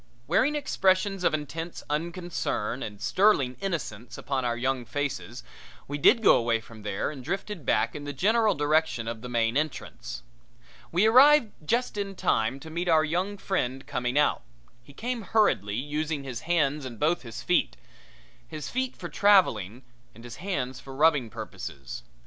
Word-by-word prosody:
Wearing 220 - +2
expressions 195 -8 +1
of - - +4
intense 160 +3 -5
unconcern 165 - -2
and 105 -2 -6
sterling 130 - +3
innocence 120 - -4
upon 135 -2 -2
our 120 -1 -1
young 130 +1 -1
faces 140 - -4 0.4
we 145 +1 -4
did 230 - +5
go - - +7
away 115 -1 +1
from 110 0 -13
there 105 +5 -2
and 135 -4 -9
drifted 185 - -4
back 110 +2 +2
in 145 - -7
the 145 - -4
general 215 - +2
direction 145 -5 +1
of 115 -1 -4
the 125 - -7
main 115 -1 +1
entrance. 150 - -3 0.7
We 180 +5 +3
arrived 255 +1 +7
just 235 +6 0
in 200 -1 -3
time 115 -4 0
to 160 - -9
meet 175 +2 -2
our 160 -1 +5
young 185 +6 -1
friend 135 -10 -2
coming 125 -2 -2
out. 150 - +3 0.4
He 125 - -16
came 235 - -4
hurriedly, 190 - +2
using 150 +3 -2
his 130 -4 -5
hands 150 -4 +2
and 130 -3 -6 0.3
his 115 -3 -8
feet - - +1
both, 60 - -27
his 155 -2 -6
feet 260 0 -2
for - - -7
traveling 130 - +3 0.3
and 115 - -13
his 120 -1 -9
hands 130 -10 -3
for 135 -1 -10
rubbing 150 -5 +3
purposes. 70 -9 -7
145 Hz, 165 wpm, -27 LUFS, 120-185 Hz, 0.7 s, go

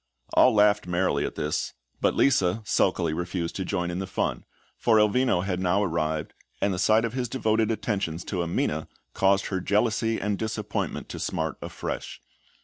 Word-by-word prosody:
All 130 - +6
laughed 105 -2 +4
merrily 90 +1 +1
at - - -8
this; 75 +1 -2 0.3
but - - +2
Lisa 110 -6 +2
sulkily 90 -5 +1
refused 85 0 -3
to 95 - -2
join 90 -2 -2
in 85 - -3
the 95 - -3
fun, - - -2 0.3
for 115 -2 +3
Elvino 105 -3 +3
had 90 -2 -1
now 95 +2 +2
arrived, 80 -3 -1 0.3
and 100 - +1
the 90 - -3
sight 110 +4 +4
of 115 - -4
his 125 -2 -2
devoted 110 -3 +1
attentions 100 -7 -2
to 90 -4 -2
Amina 80 -2 -1 0.3
caused 95 0 +3
her 95 - -1
jealousy 115 +3 +1
and 105 0 -1
disappointment 110 0 -3
to - - -6
smart - - -2
afresh. - - -5
95 Hz, 170 wpm, -26 LUFS, 90-110 Hz, 0.3 s, All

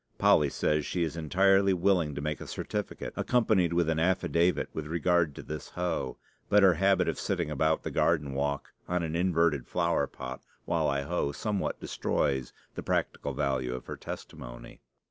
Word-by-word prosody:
Polly 75 -2 +4
says 75 +2 0
she 90 +3 -1
is 80 -1 -2
entirely 95 +4 +3
willing 85 -5 +2
to 70 - -4
make 75 -1 -3
a - - -7
certificate, - - -4
accompanied 110 -8 +2
with 85 -1 +2
an 80 -1 +1
affidavit, 85 0 +2
with 75 -1 -4
regard 85 -2 +1
to - - -8
this 75 -2 -6
hoe; 90 -2 -2 0.3
but 105 -1 +5
her 95 -2 +7
habit 95 +4 +3
of - - -1
sitting 85 -5 -1
about 80 +2 +1
the - - -4
garden 75 -5 +1
walk 70 +1 -2
on 90 -1 0
an 80 0 -3
inverted 85 -6 +2
flower - - +1
pot 65 0 -7 0.2
while - - +1
I 70 0 0
hoe 70 -2 -1
somewhat 100 +6 -2
destroys 65 -3 -1 0.2
the - - -5
practical - - -1
value 65 -2 -1
of 65 - -8
her - - -6
testimony. - - -9
80 Hz, 175 wpm, -29 LUFS, 70-90 Hz, 0.3 s, her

